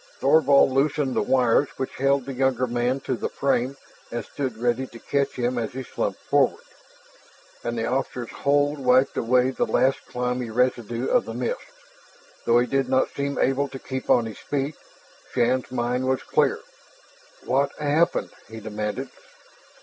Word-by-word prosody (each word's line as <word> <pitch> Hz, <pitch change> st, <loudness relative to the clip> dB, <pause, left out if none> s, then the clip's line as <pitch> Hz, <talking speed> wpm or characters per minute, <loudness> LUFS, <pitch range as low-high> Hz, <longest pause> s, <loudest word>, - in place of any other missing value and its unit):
Thorvald 140 Hz, -4 st, +5 dB
loosened 140 Hz, 0 st, +1 dB
the -, -, +2 dB
wires 130 Hz, +1 st, +3 dB
which 130 Hz, -, -4 dB
held 135 Hz, 0 st, +2 dB
the 135 Hz, -, -5 dB
younger 130 Hz, -1 st, +1 dB
man 120 Hz, +2 st, -1 dB
to 130 Hz, -, -2 dB
the -, -, -3 dB
frame 135 Hz, 0 st, 0 dB, 0.3 s
and 120 Hz, 0 st, -4 dB
stood 130 Hz, -5 st, -4 dB
ready 120 Hz, +2 st, 0 dB
to 120 Hz, -, -12 dB
catch 140 Hz, +3 st, -1 dB
him 125 Hz, 0 st, 0 dB
as 115 Hz, -1 st, -3 dB
he 130 Hz, +1 st, -5 dB
slumped -, -, -3 dB
forward. -, -, +2 dB, 1.0 s
And 120 Hz, 0 st, -3 dB
the 115 Hz, -, -1 dB
officer's 125 Hz, -2 st, -2 dB
hold 145 Hz, +1 st, +1 dB
wiped 130 Hz, +1 st, +3 dB
away 125 Hz, +2 st, +2 dB
the -, -, -1 dB
last 135 Hz, +1 st, +2 dB
clammy 125 Hz, -1 st, -2 dB
residue 120 Hz, 0 st, 0 dB
of 250 Hz, -1 st, +2 dB
the -, -, -6 dB
mist. -, -, -2 dB, 0.8 s
Though 120 Hz, 0 st, +4 dB
he 120 Hz, -, +4 dB
did 135 Hz, 0 st, 0 dB
not 130 Hz, 0 st, +2 dB
seem 140 Hz, 0 st, -2 dB
able 135 Hz, +2 st, +2 dB
to 135 Hz, -, -8 dB
keep 130 Hz, 0 st, -6 dB
on 120 Hz, -, +5 dB
his 110 Hz, -2 st, -7 dB
feet, 140 Hz, +1 st, -2 dB, 0.6 s
Shann's 125 Hz, +2 st, +1 dB
mind 125 Hz, +1 st, -1 dB
was 130 Hz, 0 st, 0 dB
clear. -, -, +1 dB, 0.8 s
"What 140 Hz, +2 st, +2 dB
happened?" 150 Hz, +3 st, +1 dB, 0.2 s
he 110 Hz, 0 st, -8 dB
demanded. 105 Hz, +4 st, -4 dB
130 Hz, 165 wpm, -24 LUFS, 120-140 Hz, 1.0 s, Thorvald